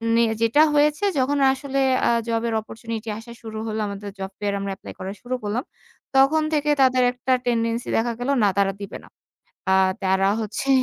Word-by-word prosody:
নে 235 - +4 0.2
যেটা 230 +6 +4
হয়েছে 300 +6 +3
যখন 275 +2 +1
আসলে 270 +1 -4 0.3
আ - - +4 0.2
জবের 230 0 -1
অপরচুনিটি 225 0 -7
আসা 230 +1 -12
শুরু 220 -1 -7
হল, 215 0 -3
আমাদের 200 0 -6
জব 190 0 -5
ফেয়ারে 200 -1 -1
আমরা 195 0 -3
এপ্লাই - - -10
করা 190 +1 -4
শুরু 255 +1 -3
করলাম। 215 +6 -2 0.5
তখন 275 +4 +5
থেকে 300 0 +1
তাদের 255 -1 +4
একটা 250 +1 -3
টেনডেন্সি 230 0 0
দেখা 235 +1 +1
গেল 245 +2 -2
না, - - +5
তারা 200 -1 +3
দিবে 200 0 -6
না। - - -15 0.6
আ - - +3 0.3
তারা 190 0 +2
হচ্ছে 220 +5 -4
230 Hz, 185 wpm, -23 LUFS, 205-260 Hz, 0.6 s, তখন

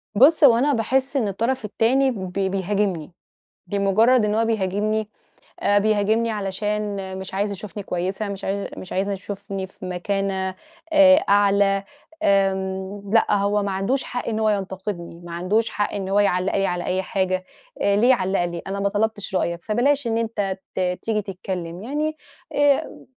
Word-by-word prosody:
بُص، 295 +7 +6
هو 240 -5 +8
أنا 285 +4 +2
باحس 265 +4 0
إن 225 -6 +1
الطرف 230 +4 -1
التاني 260 +6 +2
بي 190 -3 -2
بيهاجمني، 195 -4 -1 0.6
بمُجرد 205 +5 +3
إن 210 0 +1
هو 225 - +2
بيهاجمني، 215 0 0 0.5
آآ، 205 0 +3
بيهاجمني 215 +2 +2
علشان 210 +1 -2 0.2
مش 190 0 -7
عايز 200 +2 0
يشوفني 200 0 -7
كويسة، 190 +4 -3
مش 200 0 -5
عا 200 +1 -2
مش 185 - -7
عايز 195 +2 0
يشوفني 195 -1 -5
في 185 - -11
مَكانة، 190 +1 -2 0.4
آآ، 285 -2 +8
أعلى 200 -1 +4 0.4
آمم، 195 0 0
لأ، 225 - +4
هو 205 +1 +1
ما 200 - -2
عندوش 195 +8 0
حق 245 -1 -5
إن 220 -1 -1
هو 220 -1 +2
ينتقدني، 190 -3 -4
ما 170 - -8
عندوش 190 +7 0
حق 205 - -2
إن 195 -1 -3
هو 200 - +3
يعلّق 185 -2 +2
لي 195 0 +2
على 175 0 -2
أي 185 +1 0
حاجة، 185 -1 -1 0.4
آآ 200 0 +3
ليه 235 +5 +4
يعلّق 190 -6 +2
لي؟ 170 -1 -5
أنا 195 +1 -3
ما 200 0 +1
طلبتش 205 -1 -1
رأيك، 170 -1 -1
فبلاش 260 +5 +1
إن 225 0 0
أنت 210 -4 -2 0.2
ت - - -2 0.2
تيجي 215 -2 0
تتكلم 180 -2 -5
يعني 300 +6 -2 0.4
آآ 290 -1 +1
200 Hz, 165 wpm, -23 LUFS, 190-220 Hz, 0.6 s, هو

